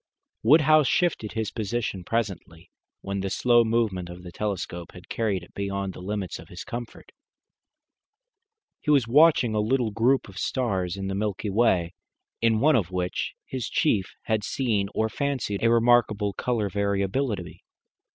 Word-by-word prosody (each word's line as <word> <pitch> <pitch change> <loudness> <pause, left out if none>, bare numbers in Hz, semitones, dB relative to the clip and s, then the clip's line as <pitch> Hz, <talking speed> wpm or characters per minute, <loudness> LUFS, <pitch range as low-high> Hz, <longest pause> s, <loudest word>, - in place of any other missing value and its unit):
Woodhouse 155 +3 +5
shifted 160 - 0
his 110 -3 -2
position 110 -3 -3
presently, 90 -6 -4 0.3
when 100 0 -3
the 95 0 -2
slow 120 +3 +4
movement 110 -6 0
of 90 +1 -10
the 90 - -9
telescope 90 -3 -4
had 90 0 -13
carried 105 -6 -1
it - - -16
beyond 100 -1 -3
the - - -10
limits 100 -2 -4
of 80 - -12
his 90 - -8
comfort. 120 -2 -8 1.7
He - - -5
was 140 -6 +4
watching 140 -3 +5
a 105 - +1
little 115 +1 +1
group 120 +5 +2
of 95 -2 -9
stars 95 -8 -1
in 95 - -4
the 95 - -2
Milky 105 +1 -2
Way, 95 -6 +2 0.5
in 115 -1 +3
one 155 +5 +4
of 100 -8 +1
which 90 -1 -3
his 130 -3 -4
chief 105 -11 +1
had 110 -2 0
seen 105 -5 0
or 110 - +2
fancied 125 -5 -2
a 115 - +5
remarkable 115 -3 +3
colour 115 -3 -1
variability. 100 +1 -2
105 Hz, 155 wpm, -26 LUFS, 95-120 Hz, 1.7 s, Woodhouse